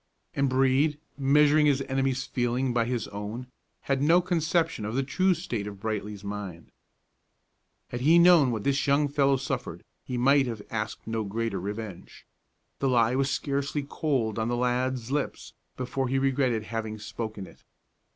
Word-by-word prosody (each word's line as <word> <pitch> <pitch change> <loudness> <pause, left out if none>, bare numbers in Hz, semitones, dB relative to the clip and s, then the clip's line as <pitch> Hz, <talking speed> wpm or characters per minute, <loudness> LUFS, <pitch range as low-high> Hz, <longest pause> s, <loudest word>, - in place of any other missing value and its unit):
And 140 -1 +2
Brede, 135 +3 +2 0.2
measuring 150 +2 +4
his 140 -2 +2
enemy's 135 -1 -1
feeling 125 0 -1
by 120 -1 +2
his 120 -1 -2
own, 105 +5 -6 0.4
had 135 -1 -1
no 165 +5 +5
conception 170 - 0
of 110 +3 -3
the 135 - +1
true 185 +7 +2
state 120 - -4
of 100 -1 -8
Brightly's 105 -1 -4
mind. 100 -4 -7 1.2
Had 120 - -5
he 160 +6 +5
known 170 -5 +7
what 110 -4 -2
this 140 +1 +1
young 140 +1 +3
fellow 140 -1 +2
suffered, 125 -9 -4 0.2
he 125 - -4
might 135 +2 +4
have 110 -3 -5
asked 110 -1 -4
no 110 0 -2
greater 110 0 -2
revenge. 100 -1 -7 0.5
The 135 - +1
lie 120 -1 +3
was 135 +1 +1
scarcely 140 +1 -1
cold 125 -9 -1
on 110 - 0
the 120 0 -1
lad's 125 0 -1
lips 145 0 -3 0.2
before 130 +1 -2
he 135 +2 0
regretted 135 -4 +1
having 110 -1 -4
spoken 110 -1 -6
it. - - -17
130 Hz, 160 wpm, -27 LUFS, 110-140 Hz, 1.2 s, known